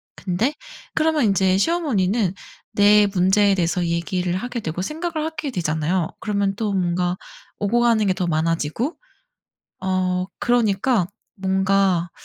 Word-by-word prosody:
근데 200 +9 -1 0.4
그러면 315 -4 +2
인제 190 -2 +3
시어머니는 220 - +1 0.4
내 205 0 +5
문제에 195 +1 +3
대해서 175 0 0
얘기를 175 +1 -1
하게 245 +4 -4
되고 165 -1 -4
생각을 315 - -3
하게 315 -2 -4
되잖아요. 160 -2 -1
그러면 200 -2 -1
또 210 0 -2
뭔가 180 -1 0 0.4
오고 220 +4 +1
가는 230 -3 +3
게 190 - +2
더 180 -1 -2
많아지고 165 - -1 0.9
어 185 -1 0
그러니까 230 -3 +2 0.3
뭔가 190 -2 +1
195 Hz, 285 characters per minute, -22 LUFS, 180-230 Hz, 0.9 s, 내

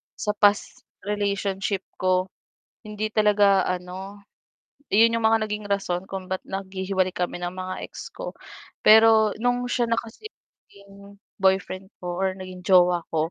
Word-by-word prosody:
sa 210 - -2
past 205 -1 +2 0.2
relationship 200 -1 -2 0.2
ko, 185 0 +1 0.6
hindi 215 0 -4
talaga 205 -3 +4
ano, 185 +3 -5 0.7
yun 230 +2 +5
yung 230 - -3
mga 225 0 +3
naging 210 0 -4
rason 190 -2 -1
kung 190 -2 -7
ba't 190 - -3
naghihiwalay 190 -1 -2
kami 175 0 -3
ng 175 0 -3
mga 185 0 -5
ex - - -9
ko. - - -7 0.5
Pero 220 -1 +6
nung 245 0 +1
siya 240 -1 0
na 230 - +2
kasi 235 - -11 0.4
naging 200 0 -16 0.2
boyfriend 190 0 0
ko 175 +1 -4
or 190 -1 0
naging 185 -1 -9
jowa 180 -1 +4
ko, 160 +1 0
195 Hz, 145 wpm, -24 LUFS, 185-210 Hz, 0.7 s, Pero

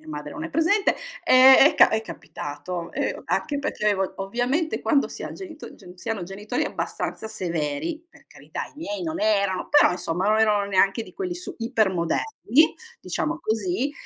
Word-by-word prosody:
mia 155 - -17
madre 150 -1 -6
non 315 - -6
è 325 - -5
presente, 330 +6 +2 0.3
ehm, 260 +1 +8
è 290 - +6
ca - - +7
è 220 - +1
capitato, 170 -4 -7
ehm, - - -2
anche 290 -2 -1
perché 210 -6 0
ov 190 -1 -2
ovviamente 245 - -1
quando 285 -4 +2
si - - -8
ha - - -5
genito 340 -5 -10
gen 180 0 -14
si - - -8
hanno 220 -4 -2
genitori 195 +4 -3
abbastanza 220 - -4
severi, 180 - -3
per - - -21
carità - - -7
i - - -18
miei 310 +1 -5
non 320 -1 -3
erano 200 -3 +1
però 295 - +6
insomma 180 +1 -2
non 215 +1 +3
erano 210 -2 +3
neanche 200 +3 +2
di - - -13
quelli 365 -1 -4
su 365 0 -7
iper 230 -4 +1
moderni, 220 - +1 0.2
diciamo 325 +1 -3
così, 220 +5 -1
220 Hz, 185 wpm, -24 LUFS, 185-310 Hz, 0.3 s, ehm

